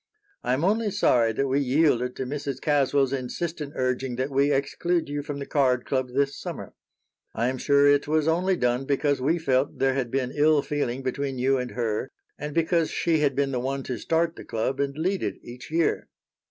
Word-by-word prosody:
I 125 Hz, -, +1 dB
am 135 Hz, +5 st, 0 dB
only 215 Hz, +2 st, +2 dB
sorry 120 Hz, -, +3 dB
that 135 Hz, +5 st, 0 dB
we 135 Hz, +1 st, +1 dB
yielded 130 Hz, -3 st, +2 dB
to 130 Hz, -, -3 dB
Mrs. 140 Hz, -1 st, -4 dB
Caswell's 140 Hz, -2 st, +2 dB
insistent 145 Hz, +3 st, -4 dB
urging 130 Hz, 0 st, -1 dB
that 130 Hz, +3 st, -2 dB
we 140 Hz, +2 st, +2 dB
exclude 160 Hz, +5 st, 0 dB
you 145 Hz, 0 st, -3 dB
from 145 Hz, 0 st, -5 dB
the 140 Hz, -, -5 dB
card 130 Hz, -4 st, +1 dB
club 130 Hz, -2 st, -1 dB
this 140 Hz, +2 st, 0 dB
summer. -, -, -7 dB, 0.6 s
I 120 Hz, +3 st, +1 dB
am 130 Hz, 0 st, -4 dB
sure 140 Hz, +1 st, +4 dB
it 145 Hz, 0 st, +4 dB
was 155 Hz, 0 st, +1 dB
only 180 Hz, +4 st, +2 dB
done 125 Hz, -3 st, 0 dB
because 140 Hz, 0 st, +1 dB
we 155 Hz, +6 st, +2 dB
felt 140 Hz, -3 st, 0 dB
there 135 Hz, 0 st, +2 dB
had 130 Hz, -3 st, -2 dB
been 130 Hz, 0 st, -1 dB
ill 150 Hz, -1 st, +3 dB
feeling 135 Hz, -4 st, -2 dB
between 135 Hz, +1 st, -2 dB
you 130 Hz, +1 st, +2 dB
and 125 Hz, 0 st, -3 dB
her 115 Hz, +1 st, -2 dB, 0.3 s
and 150 Hz, 0 st, -5 dB
because 165 Hz, 0 st, +2 dB
she 165 Hz, -2 st, +1 dB
had 145 Hz, -3 st, +1 dB
been 140 Hz, -1 st, +1 dB
the 125 Hz, -, -1 dB
one 135 Hz, +2 st, -2 dB
to 125 Hz, -3 st, -4 dB
start 165 Hz, 0 st, 0 dB
the -, -, -8 dB
club 115 Hz, +4 st, -2 dB
and 140 Hz, 0 st, -1 dB
lead 185 Hz, +4 st, 0 dB
it -, -, -2 dB
each 125 Hz, +1 st, -10 dB
year." 165 Hz, +1 st, 0 dB
140 Hz, 205 wpm, -25 LUFS, 130-150 Hz, 0.6 s, sure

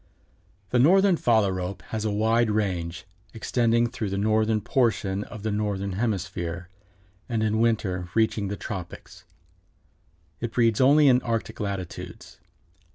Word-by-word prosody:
_) -, -, -37 dB
The 125 Hz, -, +3 dB
Northern 190 Hz, +7 st, +5 dB
Phalarope 100 Hz, -, 0 dB
has 110 Hz, -1 st, -3 dB
a -, -, +1 dB
wide 110 Hz, +2 st, +2 dB
range, 90 Hz, -5 st, -2 dB, 0.3 s
extending 115 Hz, +1 st, +1 dB
throughout 110 Hz, -3 st, -4 dB
the 100 Hz, -, -3 dB
northern 110 Hz, +1 st, +2 dB
portion 105 Hz, -4 st, 0 dB
of 110 Hz, -4 st, -10 dB
the 110 Hz, -, -1 dB
Northern 100 Hz, -2 st, -2 dB
Hemisphere 90 Hz, -4 st, -3 dB, 0.6 s
and 115 Hz, -2 st, 0 dB
in 110 Hz, 0 st, +1 dB
winter 95 Hz, -6 st, 0 dB
reaching 110 Hz, -2 st, +1 dB
the 100 Hz, +1 st, -4 dB
tropics. 90 Hz, -5 st, -8 dB, 1.1 s
It 115 Hz, -1 st, -4 dB
breeds 115 Hz, -1 st, +2 dB
only 145 Hz, +3 st, +6 dB
in 125 Hz, -1 st, +5 dB
Arctic 115 Hz, -2 st, -3 dB
latitudes. 100 Hz, -4 st, -6 dB
110 Hz, 135 wpm, -25 LUFS, 95-115 Hz, 1.1 s, only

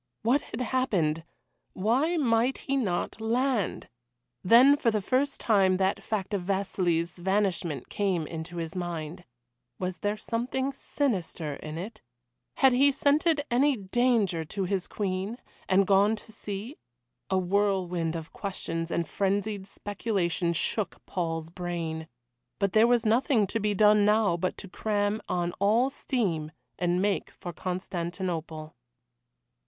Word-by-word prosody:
What 255 Hz, +6 st, +3 dB
had -, -, -6 dB
happened? 195 Hz, -12 st, 0 dB, 0.5 s
Why 260 Hz, -, +1 dB
might 245 Hz, -2 st, +2 dB
he 275 Hz, -, -2 dB
not 220 Hz, -3 st, -1 dB
land? 240 Hz, -1 st, 0 dB, 0.6 s
Then 245 Hz, +8 st, +7 dB
for 260 Hz, -5 st, +1 dB
the 215 Hz, -1 st, +1 dB
first 260 Hz, +7 st, 0 dB
time 195 Hz, -4 st, +3 dB
that 190 Hz, +1 st, +1 dB
fact 210 Hz, -2 st, -3 dB
of 200 Hz, -, 0 dB
Vasili's 180 Hz, -3 st, -1 dB
vanishment 190 Hz, -5 st, 0 dB
came 190 Hz, -6 st, 0 dB
into 165 Hz, +2 st, -7 dB
his 165 Hz, -1 st, -4 dB
mind. 175 Hz, -1 st, -5 dB, 0.5 s
Was 185 Hz, -1 st, -4 dB
there 205 Hz, 0 st, -1 dB
something 260 Hz, +5 st, -2 dB
sinister 190 Hz, -, -2 dB
in 155 Hz, +1 st, -7 dB
it? 200 Hz, +7 st, -7 dB, 0.5 s
Had 265 Hz, -2 st, +5 dB
he 275 Hz, +3 st, +5 dB
scented 290 Hz, +2 st, +2 dB
any 270 Hz, +2 st, +3 dB
danger 205 Hz, -4 st, +1 dB
to 195 Hz, +5 st, -4 dB
his 185 Hz, 0 st, -1 dB
Queen, 195 Hz, +2 st, -3 dB, 0.3 s
and 195 Hz, +1 st, +4 dB
gone 200 Hz, +3 st, +4 dB
to 220 Hz, -, -12 dB
see? 210 Hz, +6 st, -6 dB, 0.5 s
A 190 Hz, -, +2 dB
whirlwind 180 Hz, -3 st, 0 dB
of 165 Hz, -1 st, -7 dB
questions 165 Hz, -4 st, -4 dB
and 170 Hz, -1 st, -1 dB
frenzied 200 Hz, +1 st, -1 dB
speculation 195 Hz, -5 st, -1 dB
shook 200 Hz, +5 st, -2 dB
Paul's 165 Hz, -2 st, -3 dB
brain. 170 Hz, -3 st, -4 dB, 0.5 s
But 200 Hz, -1 st, 0 dB
there 220 Hz, +2 st, +6 dB
was 240 Hz, -1 st, +3 dB
nothing 230 Hz, 0 st, +3 dB
to 225 Hz, +4 st, -2 dB
be 210 Hz, -1 st, 0 dB
done 210 Hz, +1 st, +5 dB
now 210 Hz, -3 st, +3 dB
but 180 Hz, +2 st, -2 dB
to 200 Hz, -, -7 dB
cram 205 Hz, +2 st, -1 dB
on 175 Hz, -1 st, 0 dB
all 225 Hz, +7 st, +3 dB
steam 175 Hz, -, -1 dB, 0.3 s
and 175 Hz, +1 st, +1 dB
make 205 Hz, -1 st, 0 dB
for 175 Hz, -2 st, -8 dB
Constantinople. 175 Hz, -3 st, -4 dB
195 Hz, 140 wpm, -28 LUFS, 175-230 Hz, 0.6 s, Then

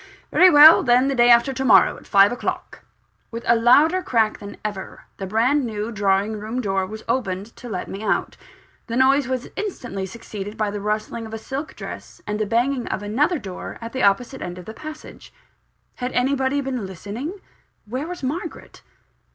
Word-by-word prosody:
Very 370 Hz, -, +7 dB
well, 305 Hz, +1 st, +9 dB
then, 250 Hz, +1 st, +3 dB
the -, -, 0 dB
day 240 Hz, -2 st, +4 dB
after 240 Hz, +3 st, +5 dB
tomorrow, 260 Hz, -3 st, +4 dB
at -, -, -15 dB
five 200 Hz, 0 st, +5 dB
o'clock." 245 Hz, -, -4 dB, 0.5 s
With 230 Hz, 0 st, -7 dB
a 235 Hz, -, +4 dB
louder 290 Hz, +10 st, +4 dB
crack 225 Hz, -8 st, +1 dB
than 200 Hz, 0 st, -9 dB
ever, 205 Hz, -3 st, -6 dB
the 195 Hz, -, -5 dB
brand 245 Hz, +8 st, +2 dB
new 220 Hz, -1 st, -4 dB
drawing 200 Hz, +1 st, 0 dB
room 220 Hz, +4 st, -4 dB
door 195 Hz, -4 st, -1 dB
was 220 Hz, +2 st, -8 dB
opened 210 Hz, -3 st, -2 dB
to 245 Hz, -, -9 dB
let 185 Hz, -, -4 dB
me 195 Hz, -, -7 dB
out. 205 Hz, -3 st, -1 dB, 0.5 s
The 230 Hz, -, -4 dB
noise 270 Hz, +1 st, +4 dB
was 260 Hz, -1 st, -3 dB
instantly 245 Hz, -, -4 dB
succeeded 210 Hz, -1 st, -8 dB
by 215 Hz, -2 st, -1 dB
the 205 Hz, 0 st, -5 dB
rustling 215 Hz, +2 st, -3 dB
of 220 Hz, -, -7 dB
a -, -, -4 dB
silk 270 Hz, +7 st, -6 dB
dress, -, -, -9 dB
and 210 Hz, 0 st, -3 dB
the 215 Hz, -, -1 dB
banging 245 Hz, +3 st, 0 dB
of 205 Hz, -, -3 dB
another 285 Hz, -, +1 dB
door, 190 Hz, -9 st, -8 dB
at 230 Hz, 0 st, -8 dB
the 260 Hz, -, -2 dB
opposite 235 Hz, +6 st, +1 dB
end 180 Hz, 0 st, -6 dB
of 180 Hz, -, -10 dB
the 220 Hz, -, -8 dB
passage. 310 Hz, +5 st, -10 dB, 0.7 s
Had 250 Hz, +1 st, -3 dB
anybody 265 Hz, +2 st, +1 dB
been 255 Hz, -7 st, -4 dB
listening? 225 Hz, -, -7 dB, 0.5 s
Where 255 Hz, +8 st, -4 dB
was 360 Hz, -4 st, -7 dB
Margaret? 320 Hz, +6 st, -5 dB
235 Hz, 185 wpm, -22 LUFS, 210-265 Hz, 0.7 s, well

